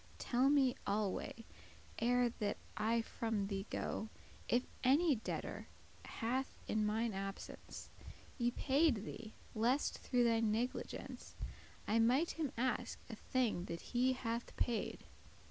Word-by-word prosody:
Tell 255 Hz, +2 st, +3 dB
me 275 Hz, -3 st, +5 dB
alway, 210 Hz, +2 st, -1 dB, 0.5 s
ere 245 Hz, +1 st, +4 dB
that 205 Hz, -1 st, 0 dB, 0.2 s
I 225 Hz, +2 st, +2 dB
from 225 Hz, -3 st, -1 dB
thee 195 Hz, 0 st, -3 dB
go, 220 Hz, -, -2 dB, 0.4 s
If 245 Hz, +1 st, +4 dB, 0.2 s
any 285 Hz, +2 st, +5 dB
debtor 220 Hz, -, -4 dB, 0.4 s
hath 255 Hz, +4 st, -1 dB
in 215 Hz, -1 st, +2 dB
mine 220 Hz, +1 st, +1 dB
absence 195 Hz, 0 st, -6 dB, 0.5 s
Y 240 Hz, 0 st, +3 dB
payed 270 Hz, -6 st, +3 dB
thee, 220 Hz, -1 st, -7 dB, 0.2 s
lest 240 Hz, +6 st, +2 dB
through 245 Hz, -2 st, +2 dB
thy 230 Hz, -1 st, +4 dB
negligence 225 Hz, +3 st, -2 dB, 0.5 s
I 220 Hz, +2 st, +3 dB
might 255 Hz, +9 st, +4 dB
him 310 Hz, -5 st, -2 dB
ask 245 Hz, 0 st, 0 dB
a -, -, -4 dB
thing 225 Hz, -6 st, 0 dB
that 170 Hz, -3 st, -4 dB
he 255 Hz, +2 st, +4 dB
hath 235 Hz, -2 st, -3 dB
paid." 235 Hz, -2 st, -1 dB
235 Hz, 130 wpm, -38 LUFS, 215-255 Hz, 0.5 s, me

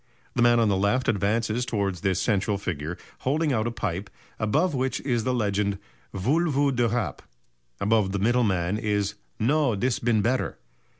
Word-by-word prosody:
The 125 Hz, -, 0 dB
man 120 Hz, 0 st, +5 dB
on 115 Hz, -, +3 dB
the 100 Hz, -, +2 dB
left 100 Hz, +7 st, +1 dB
advances 110 Hz, +3 st, +1 dB
towards 100 Hz, -7 st, -2 dB
this 95 Hz, -2 st, +1 dB
central 100 Hz, -1 st, +1 dB
figure 85 Hz, -4 st, -4 dB, 0.2 s
holding 150 Hz, +2 st, +1 dB
out 110 Hz, -1 st, 0 dB
a -, -, -1 dB
pipe, 100 Hz, -3 st, -3 dB, 0.3 s
above 150 Hz, -, +1 dB
which 130 Hz, -1 st, -1 dB
is 120 Hz, -5 st, -1 dB
the 130 Hz, -, +1 dB
legend 100 Hz, -3 st, 0 dB, 0.3 s
"Voule 150 Hz, -, +1 dB
vous 140 Hz, -1 st, +2 dB
de 120 Hz, -2 st, +2 dB
Rape." 120 Hz, 0 st, -2 dB, 0.6 s
Above 105 Hz, -2 st, +2 dB
the 100 Hz, -, -1 dB
middle 120 Hz, +5 st, +2 dB
man 95 Hz, -1 st, 0 dB
is 105 Hz, -2 st, 0 dB, 0.3 s
"No 135 Hz, 0 st, +2 dB
dis 120 Hz, +4 st, 0 dB
been 115 Hz, -3 st, +2 dB
better." 125 Hz, +4 st, 0 dB
110 Hz, 175 wpm, -26 LUFS, 100-125 Hz, 0.6 s, man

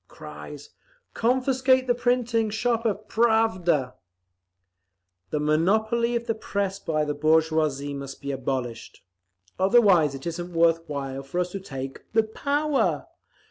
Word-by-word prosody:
(Cries, 150 Hz, -2 st, -10 dB, 0.4 s
"Confiscate 260 Hz, +2 st, +2 dB
the 245 Hz, -, +2 dB
printing 240 Hz, -2 st, +1 dB
shop 230 Hz, +1 st, 0 dB
of 210 Hz, 0 st, -3 dB
Pravda!") 200 Hz, -, +2 dB, 1.4 s
"The 150 Hz, -, -1 dB
monopoly 220 Hz, +10 st, +1 dB
of 235 Hz, 0 st, -2 dB
the 230 Hz, -, 0 dB
Press 200 Hz, -3 st, -3 dB
by 155 Hz, -4 st, -1 dB
the 150 Hz, -, -2 dB
bourgeoisie 155 Hz, -2 st, +1 dB
must 140 Hz, -1 st, -7 dB
be 140 Hz, -, -4 dB
abolished. 130 Hz, -3 st, -4 dB, 0.6 s
Otherwise 190 Hz, -, +4 dB
it 135 Hz, -, -9 dB
isn't 175 Hz, +1 st, -5 dB
worth 165 Hz, 0 st, +4 dB
while 135 Hz, -2 st, -4 dB
for 140 Hz, +6 st, -4 dB
us 180 Hz, 0 st, -1 dB
to 195 Hz, -, -4 dB
take 135 Hz, -7 st, -8 dB
the 225 Hz, 0 st, +4 dB
power! 285 Hz, +6 st, 0 dB
180 Hz, 130 wpm, -25 LUFS, 150-230 Hz, 1.4 s, Otherwise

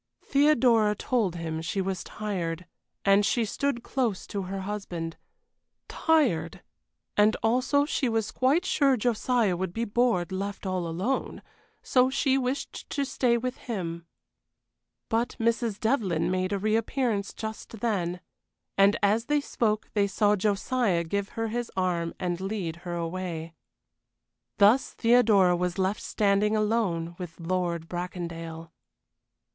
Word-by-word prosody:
Theodora 245 Hz, -7 st, +4 dB
told 210 Hz, -5 st, 0 dB
him 160 Hz, -1 st, -4 dB
she 165 Hz, +5 st, -3 dB
was 190 Hz, -1 st, -2 dB
tired, 180 Hz, -5 st, -4 dB, 0.4 s
and 200 Hz, +1 st, +5 dB
she 230 Hz, +2 st, +1 dB
stood 240 Hz, +2 st, -2 dB
close 240 Hz, -8 st, -1 dB
to 200 Hz, -, -4 dB
her 190 Hz, +1 st, -4 dB
husband; 185 Hz, -5 st, -4 dB, 0.7 s
tired 195 Hz, -, +1 dB, 0.5 s
and 210 Hz, +1 st, +4 dB
also 255 Hz, +5 st, +3 dB
she 270 Hz, -3 st, 0 dB
was 225 Hz, -2 st, -1 dB
quite 285 Hz, +8 st, +2 dB
sure 275 Hz, -3 st, +3 dB
Josiah 235 Hz, -3 st, +1 dB
would 180 Hz, 0 st, -3 dB
be 230 Hz, +1 st, 0 dB
bored 220 Hz, -6 st, +1 dB
left 200 Hz, +2 st, -4 dB
all 185 Hz, -2 st, -1 dB
alone, 185 Hz, +11 st, -2 dB, 0.4 s
so 255 Hz, 0 st, +3 dB
she 270 Hz, 0 st, +2 dB
wished 265 Hz, +1 st, -3 dB
to 280 Hz, -, -1 dB
stay 245 Hz, -3 st, +1 dB
with 255 Hz, +2 st, -3 dB
him. 170 Hz, -7 st, -5 dB, 1.0 s
But 230 Hz, +1 st, 0 dB
Mrs. 230 Hz, -2 st, 0 dB
Devlyn 190 Hz, -, +1 dB
made 185 Hz, +1 st, 0 dB
a 200 Hz, -, +1 dB
reappearance 215 Hz, +1 st, 0 dB
just 220 Hz, -1 st, -6 dB
then, 180 Hz, -6 st, -1 dB, 0.6 s
and 200 Hz, +1 st, +6 dB
as 215 Hz, +3 st, +3 dB
they 295 Hz, +2 st, +2 dB
spoke 220 Hz, -6 st, -1 dB
they 205 Hz, -2 st, +2 dB
saw 205 Hz, +1 st, +2 dB
Josiah 205 Hz, -1 st, +1 dB
give 200 Hz, +4 st, -2 dB
her 225 Hz, 0 st, -1 dB
his 240 Hz, +1 st, -3 dB
arm 175 Hz, -3 st, 0 dB
and 175 Hz, -1 st, -2 dB
lead 190 Hz, -5 st, -3 dB
her 175 Hz, 0 st, -6 dB
away. 170 Hz, -1 st, -4 dB, 1.0 s
Thus 210 Hz, +6 st, +4 dB
Theodora 220 Hz, -6 st, +4 dB
was 180 Hz, 0 st, -2 dB
left 190 Hz, +2 st, 0 dB
standing 210 Hz, +1 st, +2 dB
alone 205 Hz, -6 st, 0 dB
with 175 Hz, -2 st, -7 dB
Lord 170 Hz, -1 st, -2 dB
Bracondale. 165 Hz, -2 st, -6 dB
205 Hz, 135 wpm, -27 LUFS, 180-235 Hz, 1.0 s, and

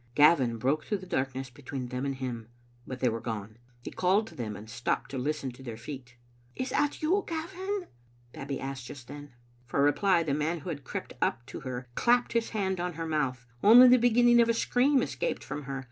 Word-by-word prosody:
Gavin 140 Hz, -6 st, +5 dB
broke 135 Hz, +7 st, 0 dB
through 210 Hz, -, -1 dB
the 185 Hz, -, -10 dB
darkness 130 Hz, -5 st, -2 dB
between 130 Hz, -1 st, -6 dB
them 125 Hz, +2 st, -3 dB
and 135 Hz, -, -2 dB
him, 125 Hz, -4 st, -5 dB, 0.4 s
but 130 Hz, -1 st, -6 dB
they 125 Hz, -, +3 dB
were 115 Hz, 0 st, -3 dB
gone. 110 Hz, -1 st, -5 dB, 0.2 s
He -, -, -6 dB
called 190 Hz, +4 st, +2 dB
to 225 Hz, -, -13 dB
them, 110 Hz, -4 st, -4 dB
and 105 Hz, +2 st, -10 dB
stopped 120 Hz, +4 st, -2 dB
to 135 Hz, -, -3 dB
listen 140 Hz, 0 st, -2 dB
to 125 Hz, -, -15 dB
their 120 Hz, -4 st, -7 dB
feet. 125 Hz, 0 st, -9 dB, 0.2 s
" 120 Hz, +1 st, -33 dB
Is 255 Hz, -, -3 dB
that 290 Hz, +1 st, 0 dB
you, 375 Hz, +6 st, +2 dB
Gavin?" 370 Hz, +4 st, -3 dB, 0.5 s
Babbie 135 Hz, -1 st, -5 dB
asked 135 Hz, -2 st, -5 dB
just 130 Hz, -3 st, -10 dB
then. 145 Hz, -1 st, -10 dB, 0.3 s
For 140 Hz, +3 st, +1 dB
reply, 170 Hz, +4 st, +3 dB
the 150 Hz, -3 st, -1 dB
man 155 Hz, +3 st, -1 dB
who 175 Hz, -, -6 dB
had 145 Hz, -4 st, -5 dB
crept -, -, -5 dB
up 120 Hz, -, 0 dB
to -, -, -8 dB
her 130 Hz, -1 st, -5 dB
clapped 245 Hz, -, +2 dB
his 230 Hz, -1 st, +1 dB
hand 190 Hz, -4 st, -1 dB
upon 180 Hz, 0 st, -2 dB
her 165 Hz, +1 st, -4 dB
mouth. 135 Hz, -6 st, -1 dB, 0.2 s
Only 240 Hz, +4 st, +10 dB
the 250 Hz, -, +7 dB
beginning 240 Hz, 0 st, +5 dB
of 235 Hz, -, +3 dB
a 230 Hz, -, +3 dB
scream 260 Hz, +3 st, +3 dB
escaped -, -, -3 dB
from 150 Hz, -1 st, -6 dB
her. 135 Hz, 0 st, -4 dB
145 Hz, 220 wpm, -29 LUFS, -, 0.5 s, Only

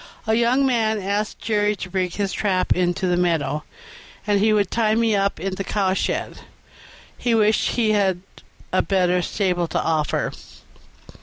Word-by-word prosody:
A 220 Hz, -, +1 dB
young 240 Hz, +4 st, +3 dB
man 220 Hz, -4 st, +1 dB
asked 200 Hz, +2 st, -2 dB
Jerry 210 Hz, -1 st, 0 dB
to 185 Hz, -, -6 dB
bring 185 Hz, -1 st, 0 dB
his 195 Hz, +2 st, -3 dB
trap 190 Hz, -3 st, +1 dB
into 180 Hz, +1 st, 0 dB
the 180 Hz, -1 st, +2 dB
meadow, 165 Hz, -4 st, 0 dB, 0.6 s
and 205 Hz, -2 st, +2 dB
he 215 Hz, +2 st, +3 dB
would 205 Hz, -3 st, +1 dB
tie 220 Hz, -2 st, +2 dB
me 225 Hz, -1 st, +2 dB
up 195 Hz, -2 st, 0 dB
in 190 Hz, +3 st, -3 dB
the 195 Hz, -, -4 dB
cowshed; 195 Hz, -2 st, -1 dB, 0.8 s
he 240 Hz, -2 st, +1 dB
wished 215 Hz, -1 st, +2 dB
he 225 Hz, -3 st, +1 dB
had 190 Hz, -4 st, +1 dB, 0.5 s
a 185 Hz, -, +4 dB
better 180 Hz, -2 st, +1 dB
stable 180 Hz, -2 st, -1 dB
to -, -, -1 dB
offer. 155 Hz, -2 st, -1 dB
200 Hz, 160 wpm, -22 LUFS, 180-215 Hz, 0.8 s, a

